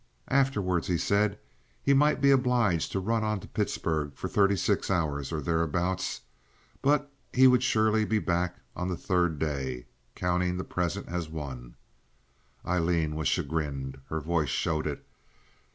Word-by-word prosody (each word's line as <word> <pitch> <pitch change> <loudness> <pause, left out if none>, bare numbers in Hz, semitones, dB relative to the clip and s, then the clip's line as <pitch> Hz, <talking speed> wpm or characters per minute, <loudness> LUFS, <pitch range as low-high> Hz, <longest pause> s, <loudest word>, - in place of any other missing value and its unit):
Afterward 105 -11 +1
he 90 - +1
said 100 +3 +1 0.5
he 140 - +4
might 150 +1 +3
be 140 0 +6
obliged 125 - +2
to 95 - -1
run 110 +3 0
on 105 -1 0
to - - -11
Pittsburg 75 -3 -2
for - - -4
thirty 100 -1 +3
six 95 +2 0
hours 75 -7 -1
or 80 -2 -2
thereabouts; 85 +4 -1 0.6
but 145 0 +2 0.2
he 130 +1 +5
would 125 -1 +6
surely 110 -3 +3
be 110 +1 +1
back 90 -2 0 0.2
on 90 - -2
the 90 -2 -2
third 90 -5 +1
day, 65 -5 -3 0.3
counting 90 0 0
the 90 - -3
present 90 +3 -2
as 85 -2 -3
one. 65 -6 -7 0.9
Aileen 85 -3 +1
was 80 -2 -1
chagrined. 70 -3 -2
Her 80 - -1
voice 80 -2 0
showed 80 +2 0
it. 75 - -5
90 Hz, 150 wpm, -28 LUFS, 80-105 Hz, 0.9 s, be